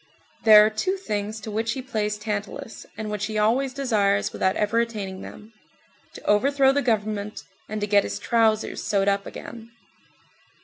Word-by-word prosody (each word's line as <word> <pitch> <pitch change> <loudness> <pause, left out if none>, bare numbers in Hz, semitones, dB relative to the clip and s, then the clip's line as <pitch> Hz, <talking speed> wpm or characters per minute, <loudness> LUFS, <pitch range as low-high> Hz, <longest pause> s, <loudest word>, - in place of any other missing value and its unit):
There 210 -1 +9
are 215 - +1
two 370 - -1
things 215 - -4
to 215 - -6
which 220 +1 -1
he 260 - -5
plays 210 -5 -2
Tantalus, 210 +1 -5
and 215 -1 -4
which 205 -1 -2
he 215 -1 -4
always 240 +6 +2
desires 215 -7 +1
without 190 0 +1
ever 215 +2 +1
attaining 205 -5 -3
them: 215 +2 -11 0.6
to - - -10
overthrow 270 +6 +4
the 285 +1 +1
government, 210 -3 -2 0.3
and 215 0 -3
to - - +1
get 205 -1 +4
his - - -4
trousers 225 -2 +1
sewed 200 -1 0
up 200 0 +1
again. 230 -1 -9
215 Hz, 170 wpm, -24 LUFS, 205-230 Hz, 0.6 s, There